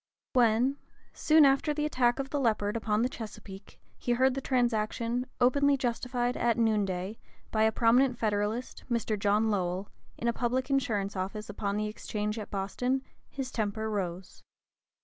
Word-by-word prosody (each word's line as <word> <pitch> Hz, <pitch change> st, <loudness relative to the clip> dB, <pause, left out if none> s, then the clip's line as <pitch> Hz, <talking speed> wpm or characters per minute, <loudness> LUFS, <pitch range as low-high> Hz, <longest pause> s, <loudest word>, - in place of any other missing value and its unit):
When, 245 Hz, +3 st, +3 dB, 0.4 s
soon 310 Hz, -1 st, +5 dB
after 275 Hz, +2 st, +3 dB
the 300 Hz, 0 st, 0 dB
attack 245 Hz, -5 st, +2 dB
of 270 Hz, -1 st, -4 dB
the 290 Hz, -, 0 dB
Leopard 215 Hz, -4 st, +1 dB
upon 220 Hz, -1 st, +1 dB
the -, -, +3 dB
Chesapeake, 210 Hz, -5 st, -10 dB, 0.2 s
he 245 Hz, -, 0 dB
heard 260 Hz, +2 st, +3 dB
the 270 Hz, -, -3 dB
transaction 240 Hz, -1 st, 0 dB
"openly 280 Hz, +3 st, +4 dB
justified 245 Hz, 0 st, -1 dB
at 235 Hz, -1 st, +1 dB
noon 220 Hz, -3 st, +2 dB
day," 190 Hz, +3 st, -4 dB, 0.3 s
by 220 Hz, 0 st, +3 dB
a 220 Hz, -, +3 dB
prominent 245 Hz, +3 st, +3 dB
Federalist, 215 Hz, +2 st, -2 dB
"in 205 Hz, -2 st, -1 dB
a 235 Hz, -, +2 dB
public 255 Hz, +3 st, -1 dB
insurance 210 Hz, -7 st, 0 dB
office 200 Hz, +3 st, -4 dB
upon 200 Hz, 0 st, -2 dB
the 215 Hz, -, 0 dB
exchange 210 Hz, 0 st, -3 dB
at 210 Hz, -, -7 dB
Boston," 245 Hz, +7 st, -1 dB, 0.3 s
his 265 Hz, -1 st, -5 dB
temper 220 Hz, 0 st, -2 dB
rose. 185 Hz, -2 st, -4 dB
230 Hz, 150 wpm, -29 LUFS, 210-255 Hz, 0.4 s, soon